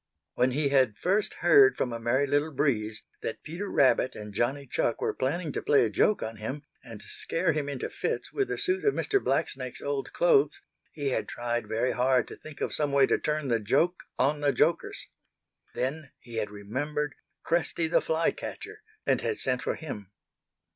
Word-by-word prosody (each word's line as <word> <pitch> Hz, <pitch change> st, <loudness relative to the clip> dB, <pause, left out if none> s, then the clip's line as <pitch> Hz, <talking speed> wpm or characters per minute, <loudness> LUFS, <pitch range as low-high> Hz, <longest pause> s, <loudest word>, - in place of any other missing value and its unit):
When 125 Hz, +1 st, +3 dB
he 140 Hz, +2 st, 0 dB
had 130 Hz, -6 st, +3 dB
first 200 Hz, +3 st, +1 dB
heard 415 Hz, 0 st, +7 dB
from 125 Hz, -, -1 dB
a 115 Hz, -, -4 dB
Merry 125 Hz, +5 st, +2 dB
Little 145 Hz, +3 st, +1 dB
Breeze 115 Hz, -7 st, 0 dB, 0.2 s
that -, -, -5 dB
Peter 180 Hz, +6 st, -5 dB
Rabbit 130 Hz, -1 st, +3 dB
and 105 Hz, -1 st, -8 dB
Johnny 135 Hz, +7 st, 0 dB
Chuck 120 Hz, -2 st, -1 dB
were -, -, 0 dB
planning 150 Hz, +4 st, -1 dB
to -, -, -3 dB
play 140 Hz, -4 st, +4 dB
a 110 Hz, -, -2 dB
joke 210 Hz, -, +2 dB
on 110 Hz, 0 st, -5 dB
him 135 Hz, +7 st, -5 dB, 0.2 s
and 110 Hz, -3 st, -10 dB
scare 165 Hz, 0 st, -1 dB
him 145 Hz, -1 st, -2 dB
into 135 Hz, -3 st, -3 dB
fits -, -, -3 dB
with 405 Hz, -2 st, 0 dB
a -, -, -2 dB
suit 380 Hz, +1 st, 0 dB
of 420 Hz, -, +3 dB
Mr. 400 Hz, -1 st, +1 dB
Blacksnake's -, -, -1 dB
old 415 Hz, -3 st, -3 dB
clothes, 480 Hz, -4 st, +3 dB, 0.3 s
he 145 Hz, -3 st, -2 dB
had -, -, -1 dB
tried 120 Hz, -2 st, -2 dB
very 115 Hz, +4 st, 0 dB
hard 125 Hz, 0 st, +2 dB
to -, -, -8 dB
think 155 Hz, -2 st, -12 dB
of -, -, -1 dB
some 145 Hz, -2 st, 0 dB
way 140 Hz, -1 st, +5 dB
to -, -, +1 dB
turn 150 Hz, -1 st, -1 dB
the 115 Hz, -2 st, +2 dB
joke 160 Hz, -, +1 dB, 0.2 s
on 145 Hz, +3 st, +2 dB
the 145 Hz, -1 st, +3 dB
jokers. -, -, 0 dB, 0.7 s
Then 140 Hz, +3 st, -2 dB
he 120 Hz, -2 st, -9 dB
had 105 Hz, -2 st, -1 dB
remembered 145 Hz, +9 st, -3 dB, 0.3 s
Cresty 170 Hz, 0 st, +1 dB
the 160 Hz, -, +3 dB
Fly 160 Hz, +1 st, +1 dB
catcher 425 Hz, 0 st, -8 dB, 0.2 s
and -, -, +2 dB
had 435 Hz, -, -1 dB
sent 125 Hz, -1 st, -1 dB
for -, -, -1 dB
him. 105 Hz, -, -7 dB
140 Hz, 195 wpm, -28 LUFS, 120-160 Hz, 0.7 s, heard